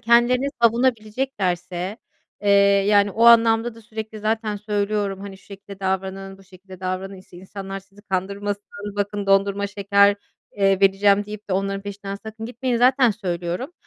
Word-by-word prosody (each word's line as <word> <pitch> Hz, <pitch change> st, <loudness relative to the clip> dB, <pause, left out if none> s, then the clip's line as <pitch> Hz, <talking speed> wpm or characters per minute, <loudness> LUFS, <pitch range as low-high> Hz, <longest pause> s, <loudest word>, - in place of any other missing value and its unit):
kendilerini 240 Hz, +3 st, +3 dB
savunabileceklerse, 215 Hz, -6 st, 0 dB, 0.4 s
eee, 205 Hz, -, -2 dB, 0.4 s
yani, 205 Hz, -1 st, +4 dB
o 225 Hz, +4 st, +1 dB
anlamda 230 Hz, 0 st, +5 dB
da 230 Hz, -, -14 dB
sürekli 220 Hz, 0 st, -7 dB
zaten 220 Hz, 0 st, -1 dB
söylüyorum 205 Hz, -1 st, -2 dB
hani: 195 Hz, -1 st, -9 dB
"Şu -, -, -23 dB
şekilde 200 Hz, 0 st, -12 dB
davranın, 190 Hz, 0 st, -3 dB
bu -, -, -17 dB
şekilde 185 Hz, 0 st, -15 dB
davranın 185 Hz, +1 st, -4 dB
işte 185 Hz, -1 st, -15 dB
insanlar 195 Hz, +1 st, -7 dB
sizi 200 Hz, +1 st, -21 dB
kandırmasın 200 Hz, +1 st, -3 dB, 0.3 s
bakın 205 Hz, 0 st, -2 dB
dondurma 195 Hz, +1 st, +2 dB
şeker, 200 Hz, 0 st, +3 dB, 0.4 s
eee, 195 Hz, -1 st, +2 dB
vereceğim 200 Hz, +1 st, +4 dB
deyip 210 Hz, 0 st, -9 dB
de -, -, -2 dB
onların 195 Hz, +1 st, -1 dB
peşinden 200 Hz, -1 st, -6 dB
sakın 220 Hz, +2 st, -8 dB
gitmeyin." 245 Hz, +1 st, -2 dB
Zaten 250 Hz, +1 st, +4 dB
söylüyorum 180 Hz, -, -4 dB
200 Hz, 145 wpm, -22 LUFS, 195-220 Hz, 0.4 s, anlamda